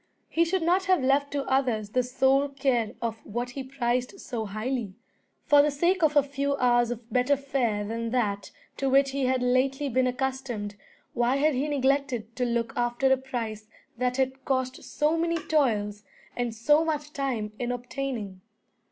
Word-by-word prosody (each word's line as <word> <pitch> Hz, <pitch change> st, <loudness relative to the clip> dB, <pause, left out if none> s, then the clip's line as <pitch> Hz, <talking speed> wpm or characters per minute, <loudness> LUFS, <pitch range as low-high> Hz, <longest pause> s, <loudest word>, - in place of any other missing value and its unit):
He 335 Hz, +1 st, +2 dB
should 365 Hz, +1 st, 0 dB
not 365 Hz, +3 st, +2 dB
have 370 Hz, -7 st, +3 dB
left 280 Hz, +2 st, +2 dB
to 285 Hz, -1 st, 0 dB
others 245 Hz, -6 st, 0 dB
the 255 Hz, -, +2 dB
sole 265 Hz, +3 st, +2 dB
care 260 Hz, -5 st, 0 dB
of 225 Hz, -1 st, -3 dB
what 240 Hz, +3 st, -4 dB
he 270 Hz, -, -5 dB
prized 255 Hz, +4 st, -2 dB
so 230 Hz, -4 st, -4 dB
highly. 215 Hz, 0 st, -3 dB, 0.5 s
For 290 Hz, -1 st, +7 dB
the 295 Hz, -, +3 dB
sake 345 Hz, +6 st, +1 dB
of 310 Hz, -2 st, +3 dB
a 290 Hz, -, +6 dB
few 280 Hz, 0 st, -1 dB
hours 240 Hz, -2 st, +3 dB
of 235 Hz, -1 st, -7 dB
better 255 Hz, +3 st, +3 dB
fare 255 Hz, -7 st, -1 dB
than 230 Hz, +2 st, -3 dB
that 210 Hz, -5 st, -1 dB, 0.3 s
to 275 Hz, -, 0 dB
which 275 Hz, +1 st, +4 dB
he 275 Hz, -1 st, -1 dB
had 255 Hz, 0 st, +1 dB
lately 270 Hz, +3 st, +1 dB
been 255 Hz, +1 st, +2 dB
accustomed, 250 Hz, -5 st, -3 dB, 0.4 s
why 240 Hz, +2 st, +2 dB
had 300 Hz, +2 st, +3 dB
he 270 Hz, +3 st, 0 dB
neglected 265 Hz, -5 st, 0 dB
to 250 Hz, -, +1 dB
look 235 Hz, -1 st, -1 dB
after 240 Hz, +2 st, +1 dB
a -, -, +2 dB
prize 230 Hz, -5 st, -5 dB, 0.3 s
that 250 Hz, +1 st, -1 dB
had 265 Hz, 0 st, -1 dB
cost 260 Hz, -1 st, -1 dB
so 305 Hz, +2 st, 0 dB
many 335 Hz, 0 st, +1 dB
toils 215 Hz, -11 st, 0 dB, 0.3 s
and 240 Hz, -2 st, -2 dB
so 295 Hz, +8 st, +4 dB
much 300 Hz, -2 st, -3 dB
time 245 Hz, -7 st, -2 dB
in 245 Hz, 0 st, -1 dB
obtaining? 245 Hz, -6 st, -4 dB
260 Hz, 180 wpm, -27 LUFS, 235-280 Hz, 0.5 s, For